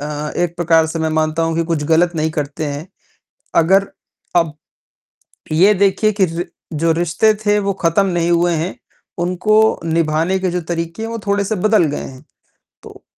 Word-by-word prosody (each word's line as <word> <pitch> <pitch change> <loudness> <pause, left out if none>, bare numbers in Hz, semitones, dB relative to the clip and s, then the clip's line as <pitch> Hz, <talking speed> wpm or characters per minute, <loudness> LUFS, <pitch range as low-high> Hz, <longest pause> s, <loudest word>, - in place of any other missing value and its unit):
अ, - - -5 0.3
एक 175 -1 -1
प्रकार 165 -2 +3
से 160 +1 -4
मैं 160 0 0
मानता 155 +1 0
हूँ 165 0 0
कि 165 - +2
कुछ 165 -2 -1
गलत 170 +2 +3
नहीं 160 0 0
करते 150 0 -4
हैं। 145 +3 -5 0.7
अगर 190 +4 +4 0.5
अब 165 -3 +2 1.0
ये 185 +7 +5
देखिए 200 +2 +2
कि 200 -2 +2
रि 170 0 -4 0.3
जो 165 +2 +1
रिश्ते 175 +6 +2
थे, 205 0 +3
वो 200 -1 -1
ख़त्म 165 +4 +3
नहीं 175 -2 0
हुए 170 0 +2
हैं, 165 +4 -3 0.4
उनको 180 +4 0 0.3
निभाने 165 +2 +1
के 185 -1 -1
जो 180 0 -2
तरीके 170 +3 -4
हैं, 225 - -4
वो 230 - -4
थोड़े-से 200 +1 0
बदल 215 0 +3
गए - - -4
हैं। 130 +1 -10 0.6
तो, - - -14
170 Hz, 180 wpm, -18 LUFS, 160-190 Hz, 1.0 s, ये